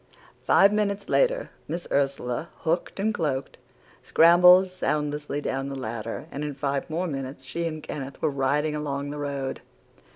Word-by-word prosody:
"Five 200 +1 +6
minutes 200 -1 -1
later, - - +2 0.2
Miss 170 +2 -4
Ursula, 135 +1 -1
hooded 170 +4 -1
and 220 +2 +1
cloaked, 140 -7 -2 0.4
scrambled 180 +3 +6
soundlessly 150 -4 -2
down 135 -1 -2
the 135 - -5
ladder, 115 +1 -5
and 145 - -4
in 145 -2 -4
five 140 +1 -2
more 170 +4 -1
minutes 135 -4 -5
she 170 0 -3
and 155 -2 -6
Kenneth 135 -1 -6
were 155 - +1
riding 145 +3 0
along 145 -1 -3
the 150 - -6
road. 140 -2 -3
150 Hz, 155 wpm, -26 LUFS, 140-170 Hz, 0.4 s, Five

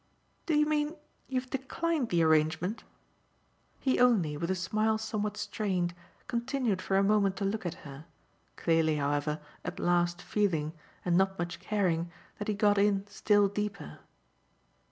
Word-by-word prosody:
"Do 320 - +2
you 300 - +5
mean 300 +1 0 0.3
you've 255 -1 -3
declined 270 +1 -1
the 170 -2 +3
arrangement?" 160 +6 +2 1.0
He 265 - +1
only, 210 -12 +4
with 170 +4 -3
a 190 - +1
smile 215 +4 +1
somewhat 215 -1 -3
strained, 185 -5 -1 0.3
continued 235 -4 -1
for 195 - +1
a 195 - +4
moment 200 -1 +3
to 200 - -2
look 200 -1 -1
at 175 -1 -7
her; 140 +2 -9 0.5
clearly, 165 -2 +2
however, 145 +1 0 0.2
at - - -5
last 175 0 +2
feeling, 165 -7 0 0.3
and 175 -1 +2
not 190 +1 +2
much 175 0 -4
caring, 175 -5 0 0.3
that 205 - -4
he 210 - 0
got 205 0 +3
in 200 -1 +2
still 205 0 +3
deeper. 200 - -4
195 Hz, 150 wpm, -30 LUFS, 170-220 Hz, 1.0 s, you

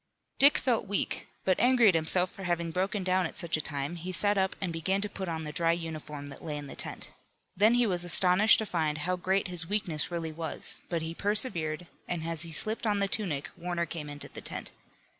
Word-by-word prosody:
Dick 280 +2 +7
felt 235 -5 0
weak, 200 0 -2 0.2
but 185 -1 +2
angry 245 -2 +5
at 195 - +6
himself 180 +3 +3
for - - -12
having 170 -1 -1
broken 190 +3 -1
down 185 -1 +1
at - - -11
such 170 - 0
a 155 - -1
time, 145 +2 -3
he 175 +3 -5
sat 205 +2 +3
up 190 -1 0
and 180 -3 -3
began 190 +4 0
to 210 - +4
put 195 -3 -6
on 160 -1 -3
the 150 - -5
dry 165 +2 +2
uniform 155 -3 -6
that 135 - -12
lay 150 -2 -4
in 145 - -7
the 140 - -9
tent. - - -5 0.4
Then 215 +5 +4
he 245 0 +3
was 180 -4 0
astonished 180 +4 +6
to 220 - -1
find 160 -6 -1
how 185 +1 +1
great 190 +2 0
his 170 -2 -3
weakness 180 -7 0
really 165 -2 -3
was, 160 -1 -4
but 170 -2 -1
he 160 +1 -4
persevered, 175 -5 -1 0.2
and 175 -2 -3
as 165 -1 -1
he 165 -1 0
slipped 220 +8 +1
on 205 -1 +2
the 200 0 +1
tunic 175 -9 -2
Warner 175 0 -2
came 155 -2 -6
into 145 0 -6
the - - -10
tent. - - -2
175 Hz, 230 wpm, -29 LUFS, 160-195 Hz, 0.4 s, Dick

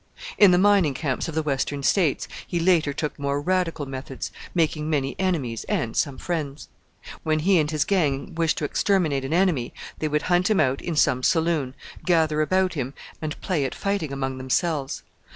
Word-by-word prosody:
In 205 - +9
the 180 - +5
Mining 190 -7 +4
Camps 135 0 -2
of 165 - -6
the 160 - +1
Western 140 -1 -1
States 165 -3 +2 0.2
he 175 - -1
later 165 -4 +3
took 150 +1 -4
more 140 0 -1
radical 170 -2 0
methods, 135 0 -6 0.2
making 155 -2 +1
many 140 -3 0
enemies 150 - -1
and 115 -1 -1
some 140 -3 0
friends. 155 -5 -4 0.5
When 155 -1 +1
he 185 +1 +4
and 150 -1 +1
his 155 -1 0
gang 155 -5 0
wished 165 -1 +1
to 150 - -1
exterminate 155 -4 +1
an 135 - -4
enemy 170 -8 +1 0.2
they 155 - 0
would 150 +1 0
hunt 180 +2 +2
him 215 - +3
out 135 -3 +2
in 170 - -3
some 130 -4 +3
saloon, 160 -4 +1 0.3
gather 160 -3 +2
about 185 +4 +2
him, 135 -3 -4 0.3
and 155 -1 -4
play 175 -7 0
at 135 - -3
fighting 195 -7 -2
among 135 -1 -3
themselves. 135 +2 -1
155 Hz, 185 wpm, -24 LUFS, 140-175 Hz, 0.5 s, In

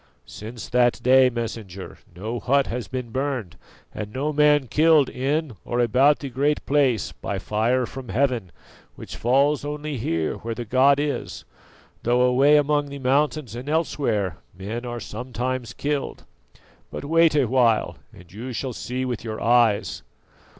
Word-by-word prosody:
"Since 110 +2 -9
that 120 -1 +3
day, 130 0 +6
Messenger, 110 -6 -6 0.2
no 110 +6 -4
hut 140 +3 +2
has 120 0 -4
been 125 -3 -5
burned 130 -8 -3 0.4
and 105 -1 -6
no 145 +6 -2
man 150 -1 +4
killed 155 +1 +4
in 145 +3 -1
or 120 - -2
about 130 +5 +4
the 140 - -6
Great 140 +4 0
Place 135 -7 +1
by - - -5
fire 120 +4 0
from 130 +1 -9
heaven, 125 -9 0 0.4
which - - -9
falls 140 +4 +2
only 150 0 -4
here 80 -7 -1
where 115 0 -5
the 120 - -5
god 135 +5 +4
is, 145 -1 -3 0.6
though 120 +1 +2
away 135 +4 +5
among 145 0 +1
the 140 0 -7
mountains 140 -1 0
and 125 +4 -6
elsewhere 120 - 0 0.2
men 110 +6 -5
are 120 0 -4
sometimes 125 0 -4
killed. 145 -1 -3 0.7
But - - -7
wait 165 +1 +4
a 140 -3 +4
while 120 -2 +2
and 90 +1 -16
you 120 +5 -6
shall 130 +2 -3
see 125 +3 -4
with 120 -3 -4
your 110 -2 -5
eyes. 115 -3 +2
130 Hz, 155 wpm, -23 LUFS, 115-140 Hz, 0.7 s, day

